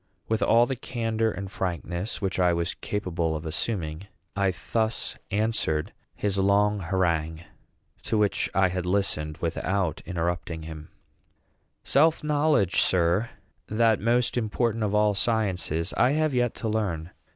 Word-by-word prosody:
With 110 -1 0
all 115 +1 +5
the 135 - -2
candor 115 -3 -1
and 100 -2 -6
frankness 90 0 -3
which 95 -1 -1
I 90 -1 +4
was 85 +2 -1
capable 85 -5 -2
of 80 +1 -5
assuming, 80 0 -3 0.3
I 100 -1 +2 0.2
thus 110 -1 0
answered 105 -8 0 0.2
his 100 -1 -1
long 100 +1 +3
harangue, 85 -3 0 0.6
to 110 - 0
which 105 -1 +1
I 95 -1 +4
had 90 0 -3
listened 90 -6 -1
without 85 +1 -1
interrupting 85 -1 -2
him: 80 -1 -8 0.9
"Self 160 +3 +3
knowledge, 145 - +2
sir, 90 +5 +2 0.4
that 110 -1 +3
most 120 +3 +1
important 115 0 0
of 105 0 0
all 105 0 +4
sciences, 95 -6 0
I 130 - +3
have 155 -1 +1
yet 120 -2 +1
to 115 - -4
learn. 95 -6 -2
100 Hz, 140 wpm, -26 LUFS, 85-110 Hz, 0.9 s, all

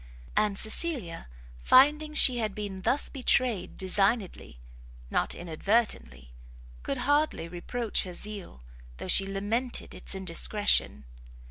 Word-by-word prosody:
And 210 -2 +1
Cecilia, 220 - -1 0.3
finding 300 - +4
she 255 -5 +6
had 215 -3 -3
been 200 -3 -6
thus 270 +9 0
betrayed 250 -6 0
designedly, 195 - -1 0.5
not - - -1
inadvertently, 160 - -2 0.5
could 140 - -4
hardly 290 - 0
reproach 215 +7 -3
her 180 -2 -7
zeal, 200 - -5 0.3
though - - -7
she 195 - +6
lamented 215 +6 -2
its - - -6
indiscretion. 185 - 0
205 Hz, 110 wpm, -27 LUFS, 180-245 Hz, 0.5 s, she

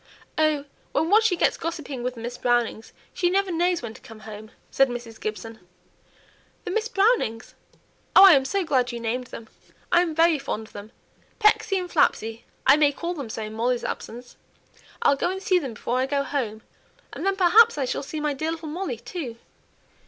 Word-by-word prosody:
"Oh! 310 -2 +1 0.3
when - - +2
she - - -4
once 445 +2 +5
gets - - +2
gossiping 310 -6 -5
with 250 +1 -3
the 230 - -9
Miss 240 +1 -5
Brownings, 240 -3 -1 0.2
she 350 - +1
never 385 +1 +1
knows 350 -1 0
when 225 -2 -6
to - - -15
come 220 -1 -13
home," 215 0 -10 0.2
said 270 -1 +3
Mrs. 240 -2 -7
Gibson. 220 +1 -5 1.1
"The - - -3
Miss 440 +3 0
Brownings? 400 - +1 0.6
Oh! 390 - +10
I'm 295 -9 +7
so 390 +8 -1
glad 255 -5 +1
you 235 - -5
named 240 +2 -3
them! 230 - -10 0.4
I'm 345 -2 +3
very 325 -1 +4
fond 220 -5 -4
of - - -19
them. 205 +2 -10 0.5
Pecksy 425 -2 +3
and 365 -1 -3
Flapsy; 225 -9 0 0.2
I 275 - +7
may 295 -2 +4
call 340 +5 -4
them 280 -9 -7
so 220 - -5
in 215 0 -7
Molly's 240 +2 -1
absence. 245 +2 -7 0.7
I'll 280 - +5
go 280 - -1
and 380 +1 -3
see 370 -1 +3
them 265 -8 -6
before 245 +4 -2
I 260 - 0
go 280 0 0
home, 230 -7 -3 0.5
and - - -6
then 390 0 +1
perhaps 395 +4 +5
I 275 - 0
shall - - -2
see 305 +2 -6
my 300 -1 -1
dear 315 +4 -3
little 325 -1 -5
Molly 380 +8 -4
too. 315 - -7
280 Hz, 195 wpm, -24 LUFS, 235-350 Hz, 1.1 s, Oh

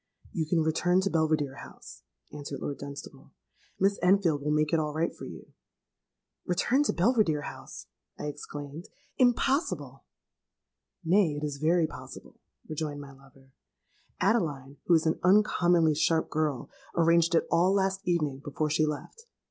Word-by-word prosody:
_'—'You 160 -3 -1
can 165 0 +2
return 175 +3 +2
to 195 - -1
Belvidere 155 -4 0
House,' - - -12 0.3
answered 145 -1 -6
Lord 140 - -5
Dunstable: 140 0 -10 0.5
'Miss 195 +1 +2
Enfield 180 -5 +3
will 150 - -2
make 150 +1 +1
it 165 - +4
all 150 -1 -2
right 165 +2 0
for - - -9
you.'—'Return 200 +9 -5
to - - +2
Belvidere 180 - +2
House!' - - -9 0.3
I - - -6
exclaimed: 145 +2 -7 0.3
'impossible!'—'Nay, 215 - -1
it - - -8
is 145 -2 -3
very 165 +3 +2
possible,' - - -10 0.3
rejoined 150 -2 -4
my 140 -1 -10
lover: 135 0 -20 0.7
'Adeline, 145 - 0
who 175 - +6
is 160 - +2
an 160 - +1
uncommonly 175 -4 +4
sharp 160 +2 +1
girl, 150 -5 -1 0.2
arranged 170 0 +3
it - - +3
all 175 +3 +4
last 195 0 +1
evening 150 -6 0
before 150 +1 -2
she 155 0 +2
left. 455 - -6
160 Hz, 140 wpm, -28 LUFS, 150-180 Hz, 0.7 s, who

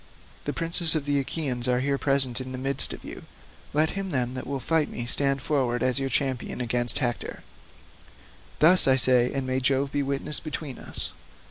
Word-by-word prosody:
The - - -2
princes 165 0 +3
of 150 -3 -2
the 145 -1 +1
Achaeans 135 -3 -2
are 125 0 +1
here 140 +1 -1
present 135 -3 +1
in 130 0 -7
the - - -5
midst 135 +1 -2
of - - -9
you; - - -9 0.5
let 155 +2 +2
him, 195 -1 -5
then, 125 -5 -1
that 130 - -6
will 140 0 -3
fight 160 +3 0
me 120 - -6
stand 140 +2 +1
forward 130 -5 -1
as 130 +1 +2
your 135 0 -2
champion 130 -3 -2
against 120 0 +3
Hector. 120 -3 -3 1.1
Thus 175 +2 +6
I 130 - +5
say, 125 -1 +4
and 135 -1 -3
may 130 0 -1
Jove 135 +1 0
be 145 - -1
witness 140 +2 -2
between 150 -3 -6
us. - - -1
135 Hz, 195 wpm, -25 LUFS, 125-145 Hz, 1.1 s, Thus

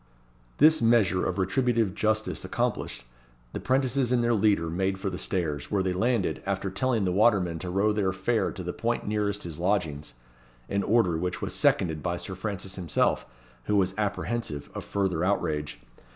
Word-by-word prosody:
This 155 +2 +6
measure 110 -6 +3
of 90 - -2
retributive 110 +2 +1
justice 110 +2 0
accomplished, - - -2 0.5
the - - -3
'prentices 130 -1 +1
and 120 -2 +3
their 120 0 +2
leader 100 -6 +2
made 95 +3 -1
for 95 0 -3
the 90 - -4
stairs, 80 -7 -2
where 100 -2 +1
they 95 -1 0
landed, 110 +1 0
after 95 -1 -2
telling 115 0 +1
the 90 - +1
watermen 95 -4 +3
to 90 - -5
row 100 +4 +2
their 100 -3 +1
fare 110 +4 0
to 95 - -6
the 90 0 -4
point 120 +1 -2
nearest 105 -1 -1
his 85 -2 -7
lodgings; 80 -8 -1 0.5
an 100 - 0
order 100 -7 +2
which 90 +1 -2
was - - -4
seconded 80 -3 +2
by 90 +1 -1
Sir 95 - -6
Francis 95 -1 -4
himself, 85 -5 0 0.4
who 105 - +1
was 95 -2 +2
apprehensive 105 -5 -3
of - - -5
further 95 -4 -1
outrage. 80 -6 -1
95 Hz, 175 wpm, -27 LUFS, 90-110 Hz, 0.5 s, This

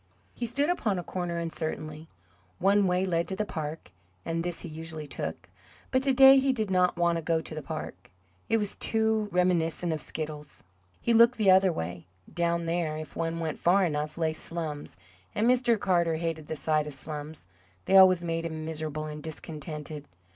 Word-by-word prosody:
He 240 - -3
stood 280 +6 +1
upon 215 - 0
a 175 - -3
corner 175 -2 -3
uncertainly. 160 -1 -4 0.5
One 200 +1 +3
way 180 +1 +1
led 170 -2 0
to 190 - -3
the 215 - -1
park, 155 - -6 0.3
and 165 0 -1
this 175 -1 -2
he - - -6
usually 160 -1 -6
took; - - -6 0.4
but 260 - +3
to 270 0 +1
day 270 +1 +8
he 270 0 +2
did 215 -5 -2
not 180 -1 +2
want 170 -1 +2
to - - -3
go 165 0 +1
to 160 - -7
the 155 - -5
park 135 - -7 0.4
it 225 - +4
was 205 -2 -2
too 220 -1 +1
reminiscent 175 -2 +1
of 155 - -3
Skiddles. 150 -2 -7 0.4
He 235 - +1
looked 235 +2 +6
the 205 -4 +5
other 190 0 +5
way. 85 - -5 0.3
Down 170 0 0
there, 165 -2 -1
if 155 0 -8
one 165 0 -2
went 160 -2 -3
far 185 +2 +4
enough, 150 -1 -2
lay 160 -1 0
"slums," 155 - -6 0.4
and 215 +2 +2
Mr. 245 -3 +3
Carter 170 -4 +2
hated 160 -2 -3
the 160 - -3
sight 155 -1 0
of 150 - -6
slums; 150 - -7 0.4
they 195 - +2
always 185 -2 +7
made 165 -1 -2
him 160 -1 -4
miserable 155 -1 -4
and 150 0 -6
discontented. 150 -1 -7
165 Hz, 190 wpm, -28 LUFS, 155-190 Hz, 0.5 s, day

